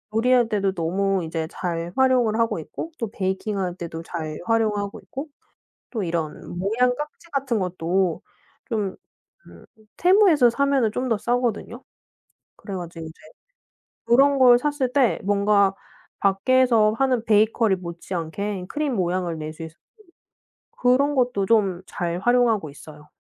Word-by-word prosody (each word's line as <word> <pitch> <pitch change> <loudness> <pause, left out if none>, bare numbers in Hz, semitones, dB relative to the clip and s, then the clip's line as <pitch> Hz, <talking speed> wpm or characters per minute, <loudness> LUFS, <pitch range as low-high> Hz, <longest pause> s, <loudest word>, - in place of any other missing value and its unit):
요리할 245 +1 +3
때도 200 -2 +1
너무 190 +2 0
이제 160 0 -3
잘 170 -1 -4
활용을 250 -4 +3
하고 225 -6 +1
있고 325 - -7
또 230 -4 -3
베이킹 195 +1 -2
할 180 -2 -2
때도 165 -2 -7
잘 160 -3 -6
활용하고 210 -3 0
있고 275 +4 -7 0.6
또 225 -4 -3
이런 170 0 -4
모양 240 +6 +1
깍지 300 +4 -8
같은 265 -5 0
것도 180 -1 -1 0.5
좀 205 -4 -2 0.5
음 - - -15 0.3
Temu에서 355 - +5
사면은 275 -3 +1
좀 250 +3 -2
더 225 - +2
싸거든요. 240 +1 -2 0.7
그래 200 - -9
가지고 170 -2 -7
이제 160 - -9 0.9
그런 275 +4 +4
걸 250 -2 +7
샀을 285 -2 -1
때 265 -4 +3
뭔가 200 -1 +3 0.5
밖에서 220 +2 +3
하는 255 -3 +1
베이커리 215 -1 +3
못지 175 +1 -8
않게 180 +3 -4
크림 295 -4 -2
모양을 180 -3 -1
낼 155 0 -5
수 160 +1 -9
있고 160 0 -10 1.0
그런 270 +4 +2
것도 245 -7 +1
좀 195 -6 +2
잘 175 0 -3
활용하고 230 -7 +2
있어요. 150 +1 -13
210 Hz, 280 characters per minute, -23 LUFS, 180-250 Hz, 1.0 s, 걸